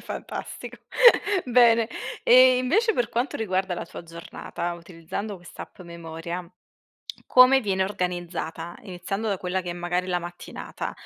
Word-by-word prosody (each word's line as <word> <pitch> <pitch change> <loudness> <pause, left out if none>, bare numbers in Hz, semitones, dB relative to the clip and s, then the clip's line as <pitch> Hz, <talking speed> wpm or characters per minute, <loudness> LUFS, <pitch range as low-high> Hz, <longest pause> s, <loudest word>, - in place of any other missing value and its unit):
fantastico. - - -7 0.7
Bene, 235 -2 +5 0.3
e 255 +1 +7
invece 425 - +2
per 240 -7 0
quanto 240 +3 -2
riguarda 190 -3 -1
la - - -5
tua - - -10
giornata 170 +1 -6
utilizzando 175 +4 -7
quest'app 175 +1 -12
memoria, 170 0 -7 0.8
come 255 +1 +7
viene 190 -4 0
organizzata? 175 -3 -4
Iniziando 195 +3 -4
da 195 -2 -1
quella 185 +1 -2
che 175 - -5
è, - - -2
magari, 175 +1 -2
la 180 -1 +1
mattinata 175 0 -7
185 Hz, 130 wpm, -25 LUFS, 175-230 Hz, 0.8 s, e